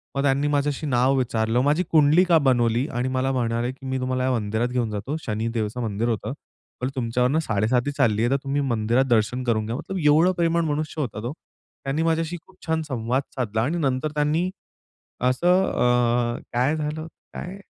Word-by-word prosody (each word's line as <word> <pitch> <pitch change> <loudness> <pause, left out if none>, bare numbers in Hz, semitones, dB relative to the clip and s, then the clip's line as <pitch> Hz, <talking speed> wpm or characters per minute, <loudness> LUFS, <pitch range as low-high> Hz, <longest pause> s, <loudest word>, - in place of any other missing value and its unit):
मग 140 - +1
त्यांनी 140 +1 +2
माझं 145 +1 0
नाव 130 +1 +3
विचारलं, 115 -1 +1
माझी 150 +6 +2
कुंडलीका 165 +3 +5
बनवली 125 -1 +2
आणि 125 +2 -1
मला 130 +1 0
म्हणाले 120 -1 -1
की 135 0 -14
"मी 130 0 -2
तुम्हाला 130 0 -1
या 130 - +1
मंदिरात 110 0 0
घेऊन 125 -2 -1
जातो." 105 +8 -3
शनिदेवाचं 115 +1 -2
मंदिर 110 +1 -1
होतं. 110 +2 -2 0.5
पण 125 - 0
"तुमच्यावरनं 125 +4 +1
साडेसाती 120 +1 0
चालली 110 -5 +2
आहे, 120 +2 +2
तर - - +3
तुम्ही 140 +1 -1
मंदिरात 120 0 +1
दर्शन 120 +2 +1
करून 110 -3 0
घ्या." 115 +2 -3
मतलब 190 +7 -5
एवढा 160 +5 +5
प्रेमळ 170 0 +2
मनुष्य 155 +1 -3
होता 110 -6 -4
तो. 125 +5 -3 0.5
त्यांनी 140 +4 -1
माझ्याशी 165 +1 0
खूप 190 - -21
छान 160 0 +1
संवाद 130 -3 -1
साधला 110 -4 -1
आणि 155 +8 -1
नंतर 140 -1 0
त्यांनी, 155 +5 +1 0.7
असं 175 +9 +3
अ, 120 -1 +2
काय 130 +5 +2
झालं, 155 +1 -3 0.3
काय? 185 +3 -6
130 Hz, 175 wpm, -24 LUFS, 120-150 Hz, 0.7 s, कुंडलीका